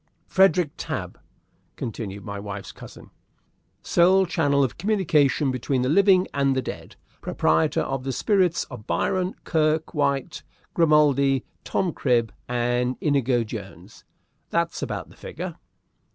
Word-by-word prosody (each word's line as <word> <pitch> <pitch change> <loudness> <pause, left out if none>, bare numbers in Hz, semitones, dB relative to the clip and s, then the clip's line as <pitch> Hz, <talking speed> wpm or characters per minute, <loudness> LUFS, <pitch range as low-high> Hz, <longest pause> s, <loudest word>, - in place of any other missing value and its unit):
"Frederick 185 -5 +3
Tabb," - - -5 0.6
continued 100 -4 -6
my 100 -1 -5
wife's 100 -1 -7
cousin, - - -13 0.7
"sole 185 +2 +4
channel 145 -5 +2
of 130 - -3
communication 155 -8 +2
between 130 +1 -1
the 125 - 0
living 185 +2 +4
and 140 -1 +1
the 130 - +1
dead. - - -8 0.3
Proprietor 80 +1 +1
of 135 -1 -3
the 135 - -2
spirits 185 - +1
of 120 -6 -11
Byron, 180 - 0
Kirke 155 0 0
White, 140 -3 -1 0.3
Grimaldi, 145 -4 +3 0.2
Tom 180 -4 -1
Cribb, 120 -5 +1
and 120 +1 0
Inigo 135 -5 +1
Jones. 105 - -10 0.5
That's - - -1
about - - -4
the - - -17
figure!" - - -7
140 Hz, 125 wpm, -24 LUFS, 125-170 Hz, 0.7 s, sole